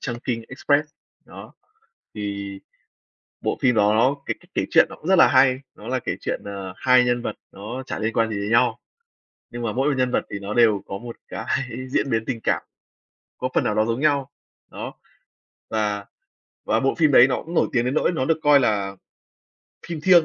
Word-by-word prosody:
"Chungking 120 -1 -3
Express", 145 +3 +1 0.4
đó. - - -12 0.6
Thì 100 -2 -5 0.8
bộ - - -1
phim 125 -2 +3
đó 105 -1 +4
nó 130 +5 +3
cái - - -2
cách - - -23
kể - - 0
truyện - - +6
nó - - -9
cũng 155 - -11
rất 190 - +5
là - - +8
hay, 130 -1 +4 0.2
nó - - -12
là 130 0 0
kể - - -3
chuyện, - - -3
ờ, 100 -2 -6
hai 125 +2 +4
nhân 120 0 +1
vật - - -4 0.2
nó 115 +7 -7
chả - - -5
liên 110 +1 -1
quan 115 -1 +1
gì 110 - -3
đến 100 +1 -3
nhau, 115 0 +3 0.7
nhưng 120 0 -6
mà 110 - -1
mỗi 135 +5 +1
một 150 - +2
nhân 125 -1 +2
vật - - 0
thì 100 - -4
nó 100 +2 -5
đều 110 -5 +4
có 100 - -5
một 120 +2 -9
cái 110 - -6 0.4
diễn 135 - 0
biến 115 0 0
tình 120 -4 -3
cảm - - +1 0.8
có 130 - -2
phần - - +3
nào 105 - 0
đó 110 - +3
giống 115 +2 -1
nhau, 140 -3 +1 0.4
đó. - - -6 0.8
Và 105 -2 -1 0.6
và 110 - +2
bộ 135 +3 +1
phim 155 -3 +3
đấy 125 -1 +8
nó 130 - -2
cũng 165 - -9
nổi - - +3
tiếng 120 -1 +2
đến 125 - 0
nỗi 155 - +2
nó 140 -6 -1
được 160 +1 +1
coi 145 -1 +6
là 100 -6 0 0.9
phim 165 -3 -4
"thiêng". 175 0 +6
120 Hz, 215 wpm, -23 LUFS, 110-135 Hz, 0.9 s, là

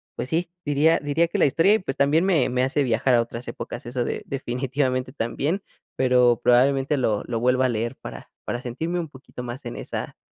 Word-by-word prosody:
pues 125 - -4
sí, 170 +1 -1
diría 150 +3 +3
diría 145 +4 +1
que - - -2
la - - +5
historia, 165 +9 +4
y - - +1
pues, 135 -9 -5
también 145 +4 +3
me 170 -9 +3
me 125 0 +1
hace 135 +2 +1
viajar 125 +1 +2
a 120 - +4
otras 115 +1 -6
épocas, - - -6
eso 120 +1 -2
de - - -3
definitivamente 130 0 -2
también, 145 - -2 0.3
pero 125 -2 +4
probablemente 135 +3 +3
lo 110 -5 0
lo 115 -2 -2
vuelva 125 +2 +2
a - - -2
leer 115 0 -2
para - - -10
para 120 - -3
sentirme 160 +9 -3
un 165 - -3
poquito 130 -2 -10
más 125 +2 -7
en 120 - -5
esa - - -5
130 Hz, 210 wpm, -24 LUFS, 120-145 Hz, 0.3 s, la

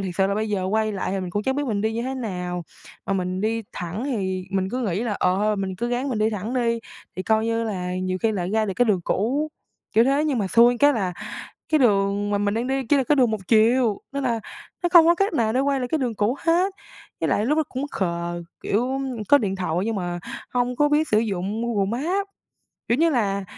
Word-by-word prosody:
thiệt 180 -2 -4
sự 190 -1 +3
là 200 - 0
bây 215 +1 -1
giờ 195 -3 -1
quay 215 +2 0
lại 190 -1 -3
thì 195 0 -1
mình 180 -1 -5
cũng 205 +3 -1
chẳng 265 +3 0
biết 290 - 0
mình 205 -4 -1
đi 220 +1 0
như 230 +1 -2
thế 260 +1 -3
nào. 180 -7 -4 0.4
Mà - - 0
mình 185 0 -1
đi 225 +1 0
thẳng 180 +8 -4
thì 190 -8 -2
mình 190 -1 0
cứ 255 - -2
nghĩ 200 0 -1
là, 230 -3 -1
ờ, 180 +1 +2
thôi 210 +1 +1
mình 190 -1 -3
cứ 240 +5 -2
ráng 250 +3 -1
mình 230 -5 -1
đi 215 +1 +2
thẳng 215 +4 -4
đi, 235 -2 +1 0.4
thì, 185 - -2
coi 220 +1 +2
như 230 0 0
là, 180 -4 -3
nhiều 185 0 -2
khi 225 -1 +2
lại 180 -2 -2
ra 220 +1 +2
được 190 - -3
cái 245 - +4
đường 205 -5 +2
cũ, 270 +10 0 0.4
kiểu 225 +2 +5
thế. 280 +3 +2
Nhưng 280 -6 0
mà 200 - 0
xui 235 +5 +5
cái 290 0 +5
là 190 -7 -1 0.6
cái 310 - +5
đường 200 -3 +2
mà 205 - +1
mình 205 +1 0
đang 235 +2 -1
đi 265 0 -1
chỉ 290 - +5
là 265 - +2
cái 290 - +3
đường 250 -4 +4
1 215 -2 -2
chiều, 225 -1 +4
nên 280 0 -2
là 230 -3 0 0.4
nó 350 - +2
không 335 -2 +8
có 340 - +6
cách 395 +2 0
nào 225 -6 +1
để 255 - +2
quay 275 -1 +1
lại 250 - -2
cái 315 - 0
đường 245 -4 -1
cũ 215 +6 0
hết. 355 +4 +2 0.5
Với - - 0
lại 210 - +1
lúc 300 +3 +2
đó - - +4
cũng 265 +3 -3
khờ, 170 -1 -2 0.2
kiểu, 250 +6 0 0.3
có 285 - +7
điện 195 -5 -2
thoại 175 -3 -2
nhưng 225 -2 -1
mà 175 -2 -3 0.3
hông 245 0 0
có 295 0 +3
biết 300 +1 +2
sử 215 - +3
dụng 205 0 -2
Google 215 0 0
Maps, 390 +4 0 0.6
kiểu 235 +4 +2
như 330 0 +4
là, 200 -6 0
220 Hz, 260 wpm, -23 LUFS, 195-255 Hz, 0.6 s, không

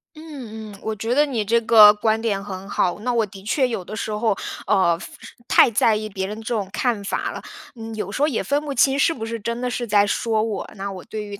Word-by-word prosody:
嗯 245 -9 -9
嗯， 200 - -13
我 220 - -2
觉 225 +4 -2
得 295 +2 +5
你 245 -7 -2
这 230 +3 +2
个 220 -2 +8
观 220 +1 0
点 200 -4 -1
很 195 -1 -8
好。 180 +2 0
那 245 +3 -2
我 230 -2 +2
的 195 -1 -13
确 255 +6 +1
有 225 -6 -4
的 215 - -8
时 215 - -4
候， 210 -1 0 0.3
呃， 185 -4 +3
非 - - -8 0.4
太 - - +5
在 220 0 +3
意 215 0 -3
别 190 -2 -4
人 210 +2 -6
这 225 +2 -4
种 205 -4 -2
看 220 -1 -1
法 200 - -2
了， - - -7 0.3
嗯， 225 -1 -8
有 205 -2 -4
时 275 - -4
候 295 - +4
也 275 - -1
分 285 +1 0
不 290 -2 -4
清 270 +3 +3
是 305 +4 +3
不 225 -8 -5
是 230 0 -4
真 235 +3 -3
的 250 0 -2
是 240 -1 -3
在 205 0 +4
说 220 +1 0
我。 220 -3 -4
那 200 0 -5
我 185 -2 -8
对 215 -2 -5
于 200 -1 -8
220 Hz, 280 characters per minute, -22 LUFS, 205-235 Hz, 0.4 s, 个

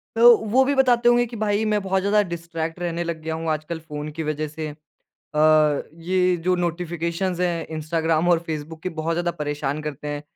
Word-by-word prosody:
तो 235 +1 +8
वो 225 +5 +2
भी 280 +1 +1
बताते 245 -3 +4
होंगे 240 0 +4
कि 235 0 -9
भाई 215 0 0
मैं 210 - +1
बहुत 190 0 0
ज़्यादा 205 +2 +3
डिस्ट्रैक्ट 165 0 -4
रहने 170 -1 -2
लग 170 -2 -4
गया 160 0 -3
हूँ 165 - -2
आज 155 -1 -2
कल 170 -1 -3
फ़ोन 150 -2 -6
की - - 0
वजह 155 0 -2
से। 155 +1 -5
अ, - - -8 1.3
ये 180 0 +2
जो 185 0 +3
नोटिफिकेशंस 175 +1 -2
हैं, 170 -2 0
इंस्टाग्राम 160 +1 0
और 175 -2 +5
फेसबुक 155 0 -5
की - - -1
बहुत 165 +1 -1
ज़्यादा 175 +1 0
परेशान 145 -1 -2
करते 150 -1 -5
हैं। 145 0 -4
170 Hz, 205 wpm, -23 LUFS, 155-190 Hz, 1.3 s, तो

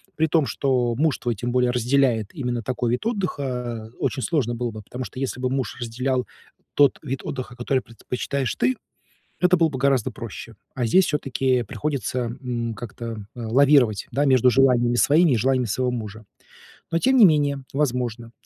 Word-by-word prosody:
При 160 +1 +2
том, 155 -4 +2
что 125 0 0
муж 150 +3 +1
твой 120 -2 -2
тем 120 +5 -3
более 125 0 +2
разделяет 120 -3 +1
именно 125 -6 -3
такой 120 0 -1
вид 125 - -2
отдыха, 125 - -3
очень 130 - -1
сложно 125 -8 0
было 120 0 -3
бы. 110 0 -8
Потому 125 +5 -7
что, 130 - -9
если 130 -1 -3
бы 125 0 -1
муж 130 -2 -2
разделял 125 +2 -1 0.5
тот 145 -1 +4
вид 135 -2 -3
отдыха, 130 -2 -5
который 130 +1 0
предпочитаешь 125 +3 -3
ты, 125 +2 +1 0.6
это 180 0 +4
было 165 -1 +4
бы 135 - -5
гораздо 135 -3 +2
проще. 115 -1 -8 0.2
А 125 -2 -1
здесь 185 +11 +5
всё-таки 130 -3 0
приходится, 140 +1 -3 0.2
м, 120 -3 -3
как-то, 115 -1 -7
э, 120 - -9
лавировать, 125 -1 +3
да, 145 +2 +1
между 130 -2 +4
желаниями 120 -1 +3
своими 155 +5 +4
и 120 - +3
желаниями 130 +2 +1
своего 125 +4 0
мужа. 110 -2 -6 0.7
Но 165 - +1
тем 265 +6 +3
не 215 - +9
менее, 145 -4 +1
возможно, 125 -5 -2
125 Hz, 175 wpm, -23 LUFS, 120-140 Hz, 0.7 s, не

